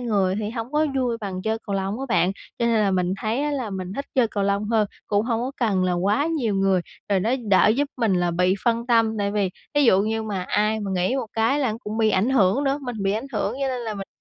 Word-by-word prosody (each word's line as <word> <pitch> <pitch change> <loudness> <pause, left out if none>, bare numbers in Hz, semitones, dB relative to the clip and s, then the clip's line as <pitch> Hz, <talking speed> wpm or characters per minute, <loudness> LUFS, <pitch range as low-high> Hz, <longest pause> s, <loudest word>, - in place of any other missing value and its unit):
người 200 -6 +1
thì 210 -1 -3
hổng 230 +2 -5
có 305 +1 +2
vui 245 -3 0
bằng 190 -3 -5
chơi 220 +2 -1
cầu 200 - -2
lông 195 +4 -2
á 270 - -3
bạn, 180 -4 +2 0.3
cho 235 - +1
nên 235 - +2
là 205 -2 +2
mình 180 -1 0
thấy 225 +5 -1
á 295 - 0
là 260 -7 -3
mình 185 -1 -5
thích 280 +7 -4
chơi 250 -4 +3
cầu 205 -2 -2
lông 200 +1 0
hơn, 220 -2 +2 0.2
cũng 205 +1 +1
hông 230 -1 0
có 250 +2 -2
cần 200 -6 +1
là 180 - +1
quá 200 - +1
nhiều 275 -11 0
người. 195 -1 +2 0.3
Rồi 200 -2 +2
nó 215 +5 0 0.2
đỡ 195 - +5
giúp 285 +1 +1
mình 225 -6 +1
là 175 -1 +1
bị 180 +2 +2
phân 235 0 +1
tâm, 225 -2 +2
tại 200 0 0
vì 200 -3 0 0.2
thí 290 - +4
dụ 195 -6 +5
như 220 +1 -1
mà 200 -4 -3
ai 210 +3 0
mà 200 -2 -3
nghỉ 185 +8 +1
một 265 - -2
cái 225 +6 +2
là 260 -6 +1
cũng 215 +2 -4
bị 220 -1 +3
ảnh 200 +7 +2
hưởng 230 +2 +3
nữa, 275 +1 +1
mình 245 -3 -5
bị 195 0 +1
ảnh 220 +6 -3
hưởng 215 - -1
cho 270 - +1
nên 255 -1 -2
là 225 -2 -4
mình 195 -1 -6
215 Hz, 280 wpm, -23 LUFS, 195-240 Hz, 0.3 s, đỡ